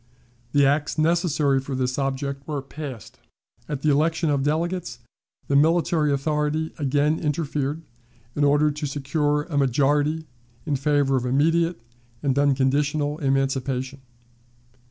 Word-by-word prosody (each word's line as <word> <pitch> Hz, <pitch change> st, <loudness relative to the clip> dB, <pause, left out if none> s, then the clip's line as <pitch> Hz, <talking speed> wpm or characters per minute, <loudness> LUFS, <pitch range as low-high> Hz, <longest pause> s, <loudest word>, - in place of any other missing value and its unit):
The 145 Hz, 0 st, +4 dB
acts 145 Hz, +3 st, +1 dB
necessary 155 Hz, -4 st, +2 dB
for 135 Hz, 0 st, -5 dB
this 130 Hz, +1 st, -1 dB
object 140 Hz, 0 st, -3 dB
were 145 Hz, -3 st, -3 dB
passed. 135 Hz, -5 st, -9 dB, 0.5 s
At 145 Hz, -2 st, -4 dB
the 155 Hz, -, +3 dB
election 160 Hz, +2 st, +1 dB
of 140 Hz, -1 st, +1 dB
delegates, 155 Hz, -3 st, -1 dB, 0.5 s
the 140 Hz, -, +1 dB
military 160 Hz, 0 st, +3 dB
authority 150 Hz, +2 st, -1 dB
again 145 Hz, +2 st, +1 dB
interfered 150 Hz, -1 st, -2 dB, 0.5 s
in 145 Hz, -, 0 dB
order 145 Hz, +1 st, +4 dB
to 150 Hz, 0 st, -4 dB
secure 145 Hz, +1 st, 0 dB
a 150 Hz, -3 st, -2 dB
majority 145 Hz, +4 st, +1 dB, 0.4 s
in 150 Hz, -3 st, 0 dB
favor 140 Hz, -1 st, +2 dB
of 125 Hz, 0 st, -2 dB
immediate 165 Hz, +5 st, +2 dB, 0.4 s
and 135 Hz, -2 st, +1 dB
unconditional 145 Hz, +2 st, +1 dB
emancipation. 135 Hz, -1 st, -1 dB
145 Hz, 125 wpm, -24 LUFS, 135-155 Hz, 0.5 s, The